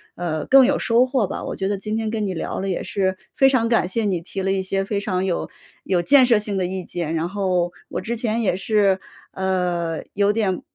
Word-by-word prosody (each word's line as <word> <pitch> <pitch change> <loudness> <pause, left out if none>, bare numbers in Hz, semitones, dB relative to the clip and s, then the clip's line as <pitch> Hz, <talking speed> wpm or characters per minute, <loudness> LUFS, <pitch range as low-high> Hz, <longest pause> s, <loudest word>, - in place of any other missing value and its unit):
呃， 155 -3 -3
更 270 -1 +7
有 280 - +2
收 235 +1 +3
获 255 -3 +1
吧。 - - -5
我 - - -4
觉 190 - -2
得 200 -1 -1
今 215 +2 -3
天 220 -1 -2
跟 215 -2 -1
你 185 - -3
聊 - - -4
了 195 - -2
也 185 - -2
是 190 -2 -1 0.2
非 270 - +5
常 240 -4 +2
感 225 -6 +3
谢 225 +4 0
你 190 -4 0
提 190 +3 -5
了 195 0 0
一 195 -1 0
些 195 +1 -1
非 200 +1 -2
常 190 -2 -1
有 185 -3 -2 0.4
有 180 -2 +1
建 270 +6 +6
设 235 -3 +4
性 210 -2 -3
的 185 - 0
意 185 +1 -4
见， 170 -2 -4
然 165 +2 -1
后 185 -3 0 0.2
我 - - -4
之 235 - -3
前 225 0 0
也 205 - +1
是， 195 -1 +2 0.3
呃， 180 -3 -1
有 200 0 +2
点 200 -4 0
195 Hz, 255 characters per minute, -22 LUFS, 185-220 Hz, 0.4 s, 更